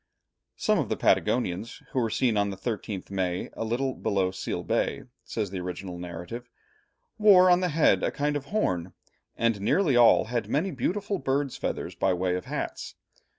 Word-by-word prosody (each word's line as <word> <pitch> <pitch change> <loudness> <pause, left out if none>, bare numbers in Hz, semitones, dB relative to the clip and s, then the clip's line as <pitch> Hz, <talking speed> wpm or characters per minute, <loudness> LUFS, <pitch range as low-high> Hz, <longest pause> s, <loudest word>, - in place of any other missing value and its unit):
"Some - - +1
of - - -1
the - - -1
Patagonians 110 -2 0
who 130 - 0
were 115 -2 +1
seen 120 0 +1
on 100 -1 +2
the 95 - -6
13th 100 -2 -4
May 90 -2 -2
a - - -4
little 125 +4 -1
below 100 -6 0
Seal 95 - -4
Bay," - - -1 0.2
says 110 -4 -3
the 95 - -4
original 90 0 -6
narrative, 90 +8 -7 0.7
"wore 185 -4 +7
on 175 - +5
the 180 -1 0
head 155 0 +3
a - - +1
kind 145 +1 -1
of 145 -1 -3
horn, 90 - -1 0.4
and 115 -3 +1
nearly 150 - +2
all 120 -1 +6
had 120 +1 -3
many 170 +7 0
beautiful 200 +1 -2
birds' 140 -1 -1
feathers - - -3
by 95 -1 +1
way 90 0 0
of 90 - -4
hats. - - -5
115 Hz, 180 wpm, -27 LUFS, 95-140 Hz, 0.7 s, wore